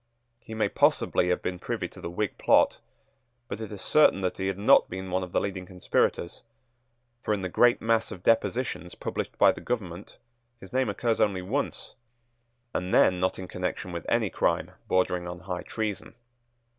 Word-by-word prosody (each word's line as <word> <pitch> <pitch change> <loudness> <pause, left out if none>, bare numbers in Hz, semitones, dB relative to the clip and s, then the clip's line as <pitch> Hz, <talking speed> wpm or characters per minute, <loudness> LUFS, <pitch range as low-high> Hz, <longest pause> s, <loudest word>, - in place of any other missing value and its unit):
He 110 - -9
may 110 - +1
possibly 90 - +2
have 90 - 0
been 90 -1 -3
privy - - -3
to - - -14
the - - -5
Whig 100 +4 -2
plot; - - +4 0.7
but 110 - -6
it 110 - -6
is 100 -2 -7
certain 155 -9 +4
that 90 0 -2
he 95 - -1
had 95 -1 -2
not 100 - +5
been 95 0 -6
one 95 +1 +1
of 90 -1 -6
the - - +2
leading 95 -2 -4
conspirators; 90 -1 -1 0.8
for, 105 - 0
in 95 - -5
the 95 - -2
great 120 +6 +4
mass 115 0 +1
of 90 - -9
depositions 115 -4 0
published - - -4
by - - +6
the - - -9
government, 100 -6 -5 0.4
his 95 - -13
name 130 0 +1
occurs 115 -2 0
only 95 -3 +1
once, 130 +10 -3 0.8
and 90 +1 -2
then 90 -1 +4
not 95 +1 0
in 95 - -7
connection 90 0 -4
with 85 -1 -6
any - - +1
crime - - 0 0.2
bordering 90 -1 +1
on 90 0 -7
high 90 -1 -4
treason. 105 -3 -4
95 Hz, 185 wpm, -27 LUFS, 90-110 Hz, 0.8 s, by